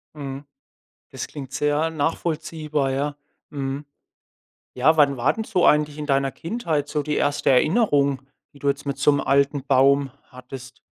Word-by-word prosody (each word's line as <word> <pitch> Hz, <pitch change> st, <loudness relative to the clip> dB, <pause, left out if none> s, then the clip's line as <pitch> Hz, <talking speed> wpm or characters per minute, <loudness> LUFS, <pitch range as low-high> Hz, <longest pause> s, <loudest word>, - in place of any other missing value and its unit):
Mhm. 140 Hz, -1 st, -7 dB, 0.7 s
Das -, -, -5 dB
klingt 135 Hz, -3 st, -9 dB
sehr 150 Hz, +2 st, +1 dB
nachvollziehbar, 155 Hz, -2 st, -2 dB
ja. 145 Hz, +2 st, -2 dB, 0.3 s
Mhm. 140 Hz, 0 st, -4 dB, 0.9 s
Ja, 145 Hz, +6 st, +3 dB
wann 140 Hz, -3 st, +4 dB
war 125 Hz, +5 st, +2 dB
denn 220 Hz, -, -4 dB
so 185 Hz, -5 st, +1 dB
eigentlich 150 Hz, 0 st, +3 dB
in 150 Hz, -, -5 dB
deiner 135 Hz, -1 st, +1 dB
Kindheit 165 Hz, -7 st, -3 dB
so 150 Hz, -, -1 dB
die 150 Hz, +1 st, -2 dB
erste 145 Hz, 0 st, +1 dB
Erinnerung, 140 Hz, -, +3 dB, 0.3 s
die 140 Hz, -, -17 dB
du 140 Hz, -, -3 dB
jetzt 140 Hz, +1 st, -2 dB
mit 140 Hz, -1 st, -3 dB
so 140 Hz, +1 st, +4 dB
'nem 145 Hz, -, 0 dB
alten 140 Hz, 0 st, +1 dB
Baum 140 Hz, 0 st, +3 dB, 0.2 s
hattest? 125 Hz, 0 st, -11 dB
145 Hz, 160 wpm, -23 LUFS, 135-150 Hz, 0.9 s, wann